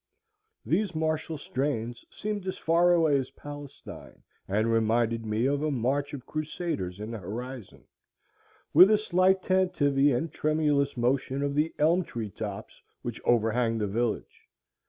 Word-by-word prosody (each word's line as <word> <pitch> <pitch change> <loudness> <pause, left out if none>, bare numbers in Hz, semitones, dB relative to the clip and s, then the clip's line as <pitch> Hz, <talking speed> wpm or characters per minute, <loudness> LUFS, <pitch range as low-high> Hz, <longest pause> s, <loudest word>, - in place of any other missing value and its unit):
These 190 +1 0
martial 155 0 -1
strains 120 -4 -3
seemed 205 -2 -4
as 185 - -3
far 170 +2 +3
away 160 -5 +4
as 130 - -4
Palestine, 145 +1 -11 0.2
and 110 +4 +1
reminded 115 0 +1
me 110 +3 0
of 140 +1 +1
a 155 - 0
march 140 +2 -1
of 130 -3 -10
crusaders 155 - -4
in 105 +2 -5
the 115 - -5
horizon, 120 +4 -7 0.9
with 180 +6 +9
a 215 - +5
slight 190 -2 +2
tantivy 145 -7 +2
and 145 +5 -1
tremulous 150 -3 +1
motion 130 +3 0
of 140 0 -1
the 150 +3 +1
elm 165 +5 +3
tree 115 - -6
tops 100 -2 -7 0.2
which - - -5
overhang 115 0 +2
the 105 - 0
village. 115 +3 -3
140 Hz, 145 wpm, -28 LUFS, 115-160 Hz, 0.9 s, with